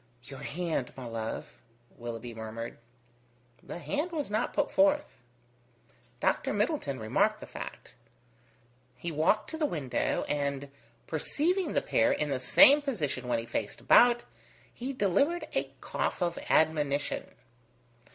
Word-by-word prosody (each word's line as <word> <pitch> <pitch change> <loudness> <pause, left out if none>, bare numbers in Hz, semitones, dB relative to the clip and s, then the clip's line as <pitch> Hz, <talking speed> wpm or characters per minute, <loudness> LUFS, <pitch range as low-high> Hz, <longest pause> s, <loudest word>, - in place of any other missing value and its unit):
"Your 135 0 -9
hand, 155 -2 -2
my 130 - -7
love," 115 -1 -5 0.3
Willoughby 120 0 -6
murmured. 110 +1 -6 0.8
The - - -7
hand 295 - -2
was 295 -9 -3
not 215 +2 0
put - - 0
forth. 295 0 +2 1.0
Dr. - - +1
Middleton 145 - -1
remarked 110 0 +1
the - - -8
fact. - - -8 1.0
He 170 - -4
walked 160 +8 +1
to 320 - -4
the 305 - +2
window, 145 - -1
and 140 -1 -2 0.3
perceiving 315 - 0
the - - +1
pair 285 +1 +3
in 150 - 0
the 135 - 0
same 290 - +7
position 155 - -2
when 120 -1 +1
he 115 - -4
faced 110 -2 -3
about, 240 0 +6 0.5
he 255 +3 -4
delivered 275 - +1
a - - -1
cough - - -2
of 170 -1 -1
admonition. 150 -2 +1
160 Hz, 130 wpm, -30 LUFS, -, 1.0 s, same